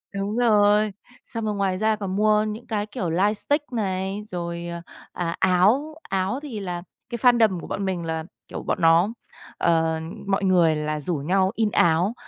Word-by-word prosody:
Đúng 200 +2 -2
rồi. 210 -3 +4 0.3
Xong 225 -2 -4
rồi 210 -1 -1
ngoài 195 -2 0
ra 220 +1 +2
còn 195 -2 -4
mua 210 0 +3
những 215 +2 -5
cái, 210 -2 -1
kiểu, 190 -5 -4
light 200 +5 +1
stick 290 0 -1
này, 195 -1 -2
rồi, 170 -3 -5 0.5
à, 170 -1 -2
áo. 215 +13 +3
Áo 195 +7 0
thì 235 -8 -5
là 175 -2 -4 0.3
cái 235 - -3
fandom 225 -7 +4
của - - -9
bọn 200 - -3
mình 180 -3 -2
là, 160 0 -3 0.2
kiểu, - - -7
bọn - - -2
nó 165 +4 +5 0.5
ờ, 160 -1 +2 0.3
mọi 195 0 +1
người 175 -4 +4
là 150 0 -2
rủ 165 +3 -2
nhau 185 +6 +1
in 220 -2 +1
áo. 170 +6 +3
195 Hz, 180 wpm, -24 LUFS, 175-215 Hz, 0.5 s, nó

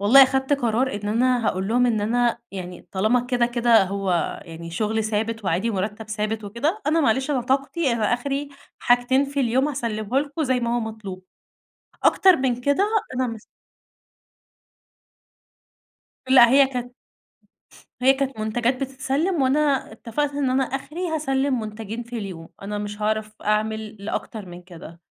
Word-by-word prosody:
والله 250 +7 +8
خدت 265 +1 0
قرار 255 -1 +1
إن 205 0 -4
أنا 240 +1 +2
هاقول 190 +1 -1
لهم 245 +2 +3
إن 225 -3 +1
أنا 235 +3 +1
يعني 180 -2 -8
طالما 215 +6 +2
كده 245 -1 +1
كده 235 -3 +4
هو 190 -2 -1
يعني 165 0 -9
شغل 215 +4 -1
ثابت، 220 +1 -2
وعادي 190 +6 0
ومرتّب 210 +2 -3
ثابت 215 0 -2
وكده 290 - -2
أنا 315 +2 +3
معلش 265 +1 +1
أنا 270 -3 +1
طاقتي 270 +3 0
أنا 225 0 +1
آخري 280 +3 -3 0.3
حاجتين 245 +2 +3
في 280 0 -3
اليوم 260 +3 +2
هاسلمه 235 -4 -2
لكم 295 +2 -3
زي 260 -2 +1
ما 235 0 0
هو - - 0
مطلوب، 215 -5 -7 0.8
أكتر 375 -2 +6
من 250 -2 -1
كده 285 +10 +2 0.3
أنا 255 0 0
مش 230 -2 -6 2.9
لأ 255 -3 +8
هي 275 +1 +6
كانت 245 -2 -5 1.1
هي 265 +1 +7
كانت 270 -3 -3
منتجات 240 +4 0
بتتسلّم، 270 +5 -1
وأنا 275 -1 +1
اتفقت 280 +6 -3
إن 280 -3 0
أنا 265 +1 +2
آخري 305 +7 -4
هاسلّم 275 -4 0
منتجين 220 +1 -6
في 235 0 -6
اليوم، 180 -6 -7
أنا 205 +1 -4
مش 205 0 -6
عارف 215 0 -1
أعمل 215 +1 -1
لأكتر 215 -1 -4
من 175 0 -10
كده، 170 -1 -12
240 Hz, 155 wpm, -23 LUFS, 215-270 Hz, 2.9 s, والله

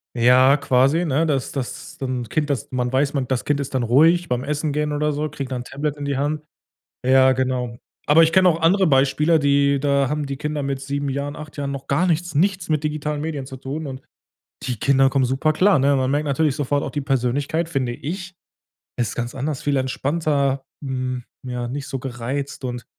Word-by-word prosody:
Ja, 130 +3 +5
quasi, 140 +4 +2
ne, 155 +1 +1
dass 140 -5 -1
das 135 -4 -6
dann 125 -4 -3
Kind 150 +4 0
dass 135 -6 -3
man 125 -1 -1
weiß, 140 +2 +1
man 135 -3 -1
das 130 -1 -1
Kind 145 -1 +1
ist 140 -1 -4
dann 130 - +1
ruhig 160 +9 +4
beim 125 0 -1
Essen 150 +2 -2
gehen 150 +1 -1
oder 150 +1 0
so, 150 +1 -2
kriegt 140 -3 -6
dann 125 -1 -2
'n - - -7
Tablet 145 +3 -4
in 145 - -5
die 140 -1 -1
Hand. 150 +2 -1 0.6
Ja, 130 0 +5
genau. 125 -2 -2 0.3
Aber 155 +3 +7
ich 165 - +2
kenne 185 -1 +6
auch 165 -1 0
andere 185 +3 +4
Beispiele, 145 +3 +3
die 140 -1 +3
da 140 -1 +1
haben 150 0 -2
die 140 -1 -4
Kinder 150 0 -3
mit 135 -1 -3
7 140 +1 -3
Jahren, 140 +2 -3
8 150 0 -10
Jahren 140 -1 -2
noch 140 -1 -6
gar 155 +7 +2
nichts, 175 0 0
nichts 185 +4 +1
mit 155 -2 0
digitalen 150 -1 -2
Medien 150 -3 -4
zu 130 0 -9
tun, 140 +4 -5
und 135 -1 -7 0.6
die 125 -2 -3
Kinder 135 +1 +3
kommen 135 -1 +2
super 135 +5 +1
klar, 190 +4 +4
ne? 140 +1 +3
Man 130 -1 +1
merkt 145 +2 0
natürlich 145 0 +1
sofort 145 0 0
auch - - -3
die 145 - -2
Persönlichkeit, 140 +5 0
finde 130 -6 -1
ich. 180 +8 -6 0.7
Es 120 -3 +1
ist - - -7
ganz 120 0 -4
anders, 140 +2 -3
viel 145 -2 0
entspannter, 140 0 0 0.2
hm, 130 -2 -3 0.2
ja, 125 -1 -3
nicht 140 +3 -5
so 135 -2 -4
gereizt 130 +3 -5
und 125 -1 -4
140 Hz, 215 wpm, -22 LUFS, 130-150 Hz, 0.7 s, Aber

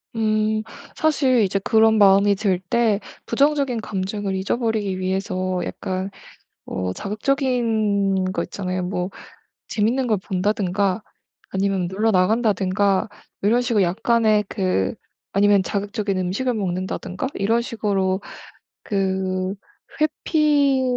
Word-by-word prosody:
음. 215 -1 +1 0.3
사실 270 -6 +2
이제 195 -1 +1
그런 220 +2 +4
마음이 200 0 +5
들 190 -3 0
때 230 -4 +2 0.3
부정적인 280 -5 +1
감정을 195 0 -3
잊어 190 +4 -1
버리기 215 -5 -1
위해서 185 -1 -1
약간 185 +1 -4 0.6
어 95 -1 -3
자극적인 215 - 0
거 - - -1
있잖아요. 185 -2 -3
뭐 180 0 -2 0.6
재밌는 235 +5 +1
걸 215 -4 +1
본다든가 195 +1 0 0.5
아니면 190 -2 0
놀러 210 +5 +1
나간다든가 200 -1 +2 0.3
이런 225 +5 +3
식으로 235 -5 +2
약간의 215 +3 +2
그 185 - 0 0.4
아니면 200 0 +4
자극적인 205 0 -2
음식을 195 +8 -1
먹는다든가 190 +2 -3
이런 225 +4 +1
식으로 195 -5 -1 0.6
그 190 -1 -1 0.5
회피 295 -3 +2
200 Hz, 260 characters per minute, -22 LUFS, 190-225 Hz, 0.6 s, 마음이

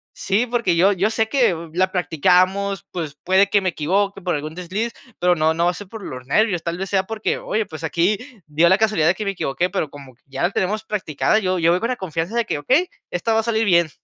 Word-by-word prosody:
Sí, 205 +5 0
porque 235 -7 0
yo 185 +4 +5
yo 200 +2 +1
sé 220 0 0
que 240 -10 +3 0.2
la 185 +2 +1
practicamos, 185 +3 +1
pues, 160 -5 -5
puede 190 +2 +3
que 200 -1 +3
me 185 - 0
equivoque 195 +5 -1
por 175 -2 -1
algún 150 +1 -5
desliz, 190 +6 -3 0.3
pero 180 0 +3
no 160 0 +2
no 170 - +1
va 175 - +3
a - - -8
ser 200 +2 -9
por 220 0 -9
los 130 -6 -7
nervios, 195 +2 +2
tal 170 0 -3
vez 195 +1 -4
sea 190 -1 +2
porque, 220 +1 -2
oye, 220 0 -1
pues, 155 -2 -10
aquí 175 +6 +1 0.3
dio 155 +3 +3
la 190 - +5
casualidad 215 -7 +2
de 175 - +3
que 215 - -5
me 195 - 0
equivoqué. 175 0 -1
Pero 180 -6 -1
como 140 -2 -12
ya 135 - -4
la 175 - +2
tenemos 205 +3 -1
practicada, 210 -2 0
yo 185 -3 0
yo 170 -1 +3
voy 180 - +2
con 230 - -2
la 255 - 0
confianza 175 0 -4
de 235 -1 +1
que, 145 - -2
okey, 290 - +2 0.2
esta 225 +6 0
va 220 - +3
a 225 - 0
salir 225 -1 +1
bien. 170 -4 +4
185 Hz, 250 wpm, -21 LUFS, 170-210 Hz, 0.3 s, yo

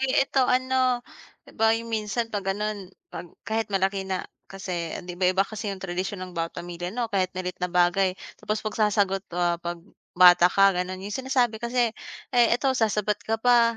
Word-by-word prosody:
ay 265 - 0 0.2
eto 270 -1 +1
ano, 255 -1 +2 0.6
ba 225 0 +5
yung 230 0 -7
minsan 225 +2 -2
'pag 205 -1 -2
gano'n 205 -1 -3 0.2
'pag 170 +1 -7 0.2
kahit 220 +2 -1
malaki 195 0 0
na 185 -1 -2 0.2
kasi 180 -4 -4
'di 180 0 -7
ba 180 - +4
iba 190 +1 +2
kasi 215 0 -5
yung 195 - -5
tradisyon 185 +1 -3
ng 185 - -11
bawat 165 0 -3
pamilya 175 0 -5
'no 235 +3 -2
kahit 185 -2 +1
maliit 180 -1 -4
na 180 - 0
bagay. 180 +1 +2 0.2
Tapos 215 +1 -3
pagsasagot, 205 -3 +1
ah, 175 -1 +1
'pag 175 0 -4 0.4
bata 175 -1 +8
ka 195 +1 +5
gano'n 180 +1 -3
'yong 205 - -5
sinasabi 250 -4 +1
kasi, 235 -1 +1 0.4
"Ay 240 -1 +5
eto 265 +1 +1
sasabat 210 -2 +1
ka 225 0 -1
pa, 235 -1 +4
200 Hz, 185 wpm, -25 LUFS, 185-230 Hz, 0.6 s, bata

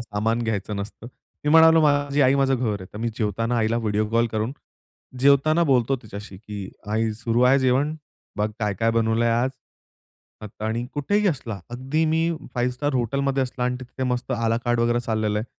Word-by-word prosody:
सामान 115 0 -1
घ्यायचं 105 -2 -2
नसतं. 100 +3 -7 0.4
मी 150 - +1
म्हणालो 160 +1 +7
माझी 145 -1 +2
आई 130 +1 +4
माझं 135 -1 +2
घर 110 -5 -2
आहे. 95 - -8
तर 105 - -8
मी 115 +1 -1
जेवताना 115 +2 -1
आईला 110 +1 +1
व्हिडिओ 105 -1 0
कॉल 115 +1 +3
करून 110 +3 -1 0.7
जेवताना 140 +5 +4
बोलतो 130 +1 +3
तिच्याशी, 105 -2 -9
की 100 -1 -8 0.2
आई 110 0 0
सुरू 115 +2 -1
आहे 130 +2 +5
जेवण, 135 +4 +1 0.4
बघ 105 +1 0
काय-काय 110 +1 0
बनवलंय 115 0 +1
आज. 120 +3 +1 1.1
आणि 110 +2 -2
कुठेही 205 +9 +1
असला. 120 - -3
अगदी 135 +6 -1
मी 160 +1 +1 0.2
5 125 +1 0
स्टार 145 +2 -2
हॉटेलमध्ये 135 +3 0
असला 125 -1 -3
आणि 125 0 0
तिथे 130 +1 -7
मस्त 125 +1 -2
आला 115 -1 +1
कार्ड 120 -1 +1
वगैरे 120 +1 +2
चाललेलं 110 -3 -1
आहे. 105 - -3
120 Hz, 175 wpm, -23 LUFS, 110-135 Hz, 1.1 s, म्हणालो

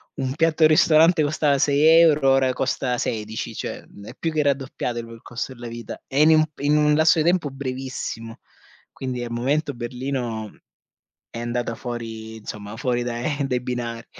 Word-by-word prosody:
1 130 -1 -2
piatto 160 +1 +2
al 155 - +7
ristorante 160 +2 +5
costava 145 -1 +1
6€ 150 0 +5
ora 135 -1 +3
costa 130 -1 -1
16, 110 -2 -3
cioè - - -5 0.2
è - - -9
più 165 - -2
che 155 - +2
raddoppiato 135 -3 -2
il 115 - -7
il 115 0 -12
costo 125 +2 -5
della 120 -1 -9
vita 115 0 -8
e 140 +2 +1
in 155 - +6
un 155 0 +6
in 145 +1 +2
un 150 0 +4
lasso 160 +2 +4
di 155 - +1
tempo 175 -3 +2
brevissimo. 130 -4 -5 0.5
Quindi 125 -2 -4
al 120 - -6
momento 140 +5 0
Berlino 120 -3 -4 0.8
è 115 - -7
andata 120 0 -2
fuori, 115 -2 -6
insomma 105 -1 -8
fuori 120 0 -1
dai 125 +5 -2
dai 125 -2 -1
binari. 120 -2 -4
130 Hz, 170 wpm, -23 LUFS, 120-150 Hz, 0.8 s, al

